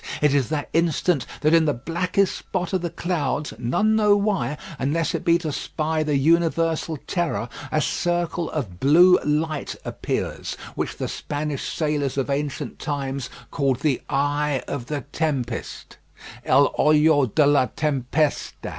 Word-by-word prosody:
It 150 -2 +3
is 140 -3 +3
at - - -14
that 150 -2 -2
instant 165 -3 +1
that 155 +2 +3
in 165 -1 +5
the 150 - +1
blackest 175 +8 0
spot 180 0 -4
of 185 - +1
the 175 - -2
clouds, 155 -4 -2
none 210 - +2
know 210 -2 +4
why, 195 - 0 0.2
unless 155 +5 0
it - - -2
be 170 -1 +4
to 165 -3 -4
spy 155 +2 -2
the 150 -2 +1
universal 165 +1 +2
terror, 160 - -1 0.2
a 155 - +2
circle 175 +1 -1
of 105 - -4
blue 175 +6 +6
light 150 0 -1
appears, - - -3 0.2
which - - -3
the - - -2
Spanish 145 -1 -4
sailors 150 -4 -1
of 135 +1 0
ancient 145 0 -3
times 135 -3 -3 0.2
called 135 -3 0
the 145 -5 +1
eye 145 0 0
of 125 -4 -4
the 150 -2 -3
tempest, 135 -8 -3 0.5
el 140 +2 +4
ojo 150 -2 +5
de 145 +7 +3
la 140 -3 +4
tempestad. 145 0 -1
150 Hz, 155 wpm, -23 LUFS, 140-165 Hz, 0.5 s, blue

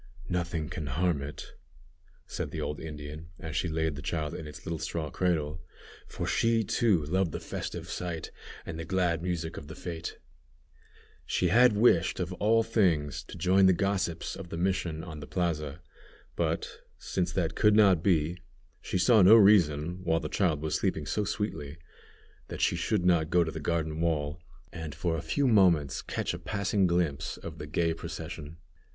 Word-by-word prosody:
"Nothing 85 -3 -2
can 80 -4 -5
harm 80 +2 0
it," 70 +1 -7 0.8
said - - -4
the - - -6
old 75 - -3
Indian, 75 0 -8
as 80 0 -7
she 90 - 0
laid 80 -1 0
the 75 - -7
child 75 -1 -2
in 80 -4 -6
its 75 -1 -11
little 85 -1 -3
straw 80 -2 -3
cradle, 80 -3 -1 0.5
for - - -5
she, 115 -1 +2
too, 110 -5 +2
loved 90 +2 +1
the - - -4
festive - - -5
sight 85 -3 -4 0.3
and 80 +1 -6
glad 90 -3 +1
music 85 -2 -3
of 75 - -8
the 80 - -9
fête. 85 -1 -5 1.1
She 90 - 0
had 120 +4 +6
wished, 100 -6 +3
of 90 0 -2
all 110 +4 +3
things, 90 -11 +1
to - - -10
join 95 +1 +4
the 95 - +6
gossips 95 -3 -1
of 95 -3 -9
the 85 - -5
mission 85 -3 -1
on 80 -4 -8
the 75 - -8
plaza, 80 -3 -2 0.5
but, - - -2 0.2
since - - -2
that - - 0
could 105 0 +4
not 100 -6 +5
be, 85 -1 +1 0.4
she - - -2
saw 105 +5 +5
no 95 +5 +9
reason, 90 -6 +4
while 80 -2 +2
the - - -5
child 80 -7 +1
was 80 - -2
sleeping - - 0
so 105 - -1
sweetly, 85 -8 -3 0.7
that - - -7
she - - +2
should 100 -5 0
not 85 -3 +3
go 90 -1 +4
to 80 - -3
the 80 - -6
garden 80 0 -1
wall, 80 -1 -1 0.3
and 80 -3 -6
for 85 -2 -1
a 80 - -3
few 140 - 0
moments 90 - +4
catch - - -3
a 85 - -5
passing 100 +1 0
glimpse 85 -5 -1
of 80 -2 -9
the 75 - -6
gay 85 +2 +1
procession. 80 -1 -7
85 Hz, 180 wpm, -29 LUFS, 80-95 Hz, 1.1 s, no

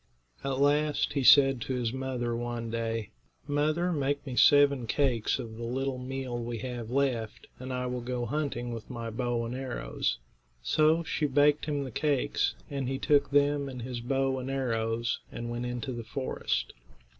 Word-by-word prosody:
At 135 -1 -1
last 145 +1 +2
he 140 - +1
said 135 -1 +7
to 130 - -2
his 120 -2 -1
mother, 130 -3 -2
one 120 -1 -3
day: 115 -1 -2 0.3
"Mother, 155 +5 +1
make 145 -1 -1
me 130 -3 -5
seven 140 -3 +5
cakes 125 -4 +1
of 110 -1 -7
the 120 - -6
little 130 +2 -2
meal 125 -2 -4
we 120 0 -4
have 120 -1 -5
left, 125 -5 -1
and 130 +1 -6
I 125 0 -2
will 125 0 -3
go 120 0 -2
hunting 120 -3 -2
with 115 -2 -8
my 115 -2 -5
bow 120 0 -1
and 115 - -4
arrows." 130 0 -2 0.5
So 155 - +3
she 155 -1 0
baked 145 +2 +3
him 145 -2 -1
the 130 - -6
cakes, 145 +1 +1
and 140 -3 -3
he 135 - -1
took 145 0 +3
them 145 0 +2
and 125 -3 -7
his 125 -1 -4
bow 135 +1 0
and 130 +1 -5
arrows 115 -3 -1
and 120 0 -5
went 120 +1 -3
into 125 +2 -3
the 120 -2 -5
forest. 130 +3 -2
130 Hz, 180 wpm, -29 LUFS, 120-140 Hz, 0.5 s, said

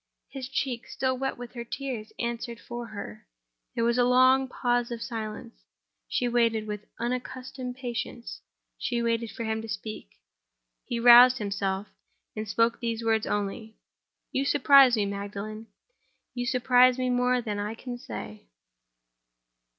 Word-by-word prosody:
His 265 -2 -7
cheek, 260 -3 -2
still 260 -1 -1
wet 270 +1 -3
with 245 0 -9
her 235 -2 -5
tears, 235 -3 -5
answered 235 0 -4
for 240 0 -7
her. 155 - -9 0.5
There 230 - 0
was 235 +1 +2
a - - +5
long 255 +2 +5
pause 245 -1 0
of 235 -1 -5
silence; 220 -2 -6 0.5
she 245 - 0
waited—with 220 -3 0
unaccustomed 250 +1 -4
patience, 235 - -5 0.4
she 235 -1 -1
waited 230 0 0
for 230 - -6
him 220 0 -2
to 225 - -9
speak. 210 - -6 0.8
He 235 - -3
roused 245 +2 +9
himself, 200 -1 -2 0.5
and 215 0 -4
spoke 230 +2 +2
these 230 -1 -3
words 220 -1 +1
only: 210 +2 -3 0.6
"You 270 - 0
surprise 275 -2 +6
me, 210 -2 +1
Magdalen; 200 +2 -6 0.7
you 245 -1 -3
surprise 250 0 +4
me 255 -1 0
more 250 0 +2
than 210 -4 -3
I 210 +2 -3
can 245 +1 -7
say." 105 - -8
235 Hz, 145 wpm, -27 LUFS, 215-250 Hz, 0.8 s, roused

